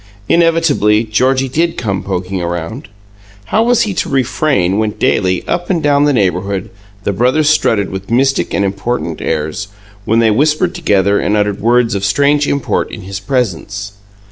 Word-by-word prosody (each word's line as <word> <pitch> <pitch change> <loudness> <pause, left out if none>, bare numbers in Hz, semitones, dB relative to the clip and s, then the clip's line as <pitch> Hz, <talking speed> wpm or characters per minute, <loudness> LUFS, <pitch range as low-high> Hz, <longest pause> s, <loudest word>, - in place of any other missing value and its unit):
Inevitably, 165 -11 +3
Georgie 130 +5 +1
did 165 +6 -1
come 100 -5 -2
poking 95 -1 -3
around. 85 - -4 0.6
How 220 - +1
was 235 0 +3
he 210 - -2
to - - -2
refrain 130 - +1
when 110 -1 -1
daily, 95 -3 0
up 175 - -2
and 180 -3 +1
down 145 0 +3
the 145 - +3
neighbourhood, 95 -3 -1 0.3
the 100 - -1
brothers 130 +8 +2
strutted 110 -10 +1
with 95 0 -6
mystic 135 +3 +1
and 100 - 0
important 95 -3 -3
airs, 80 +4 -2 0.4
when 110 +3 +1
they 115 -1 +4
whispered 155 +9 +1
together 100 - +1
and 105 - 0
uttered 105 -1 -1
words 120 +1 +2
of 100 -1 -2
strange 145 +8 +2
import 140 -2 -1
in 110 - -8
his 95 +1 -6
presence? 100 -3 -3
110 Hz, 165 wpm, -14 LUFS, 100-140 Hz, 0.6 s, they